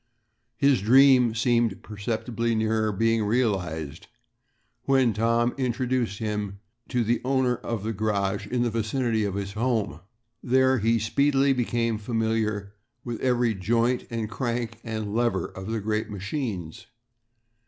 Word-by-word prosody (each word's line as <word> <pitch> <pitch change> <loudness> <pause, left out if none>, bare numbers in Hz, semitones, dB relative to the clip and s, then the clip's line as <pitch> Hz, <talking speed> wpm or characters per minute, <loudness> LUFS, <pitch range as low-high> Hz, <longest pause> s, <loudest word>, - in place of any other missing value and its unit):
His 140 -5 +3
dream 125 0 +5
seemed 115 -3 +1
perceptibly 115 +2 -2
nearer 110 0 +1
being 115 +2 +1
realized 90 - -1 0.8
when 130 -4 +3
Tom 115 +3 +1
introduced 125 -3 -1
him 105 -2 -3 0.3
to 125 -2 +1
the 115 +1 0
owner 130 -2 +1
of 110 -3 -4
a 115 - -1
garage 100 -1 -1
in 125 +1 0
the 120 - 0
vicinity 115 0 0
of 100 -2 -2
his 100 -1 -3
home. 110 - -1 0.4
There 130 +1 +3
he 115 +2 +2
speedily 140 +5 +2
became 115 -3 0
familiar 110 -2 -1 0.3
with 120 -2 -5
every 120 -3 +2
joint 115 +5 0
and 115 -2 -3
crank 115 0 -3
and 110 -2 -4
lever 120 +1 +1
of 95 +1 -8
the 110 0 -2
great 110 +1 -2
machines. 100 - -5
115 Hz, 130 wpm, -26 LUFS, 105-120 Hz, 0.8 s, dream